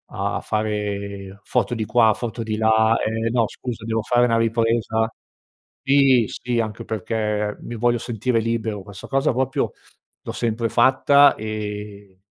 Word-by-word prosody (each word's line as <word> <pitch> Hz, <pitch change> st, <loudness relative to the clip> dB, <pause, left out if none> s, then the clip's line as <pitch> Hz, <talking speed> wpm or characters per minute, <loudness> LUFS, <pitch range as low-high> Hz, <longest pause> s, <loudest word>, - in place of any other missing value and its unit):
a -, -, -2 dB
fare 100 Hz, -2 st, -3 dB
foto -, -, 0 dB
di 110 Hz, -2 st, -2 dB
qua, 110 Hz, -2 st, +4 dB
foto 115 Hz, +1 st, -5 dB
di 110 Hz, -1 st, -2 dB
là 110 Hz, 0 st, +3 dB
"Ehm, 115 Hz, +1 st, -1 dB
no 115 Hz, -3 st, +2 dB
scusa 115 Hz, -3 st, -7 dB
devo 115 Hz, 0 st, -1 dB
fare 120 Hz, +2 st, +3 dB
una 115 Hz, -1 st, +2 dB
ripresa" 115 Hz, -1 st, +1 dB, 0.7 s
Sì, 135 Hz, -4 st, +4 dB
sì, 120 Hz, -1 st, -2 dB
anche 110 Hz, +1 st, -3 dB
perché 105 Hz, 0 st, -2 dB
mi 120 Hz, -, -7 dB
voglio 120 Hz, +1 st, +1 dB
sentire 115 Hz, +1 st, -1 dB
libero, 110 Hz, -3 st, -2 dB
questa 100 Hz, -1 st, -10 dB
cosa 135 Hz, +1 st, +1 dB
proprio 130 Hz, -3 st, -1 dB, 0.5 s
l'ho -, -, -5 dB
sempre 115 Hz, 0 st, -1 dB
fatta, 135 Hz, +3 st, +5 dB
ehm, 105 Hz, -2 st, -6 dB
110 Hz, 145 wpm, -22 LUFS, 105-120 Hz, 0.7 s, fatta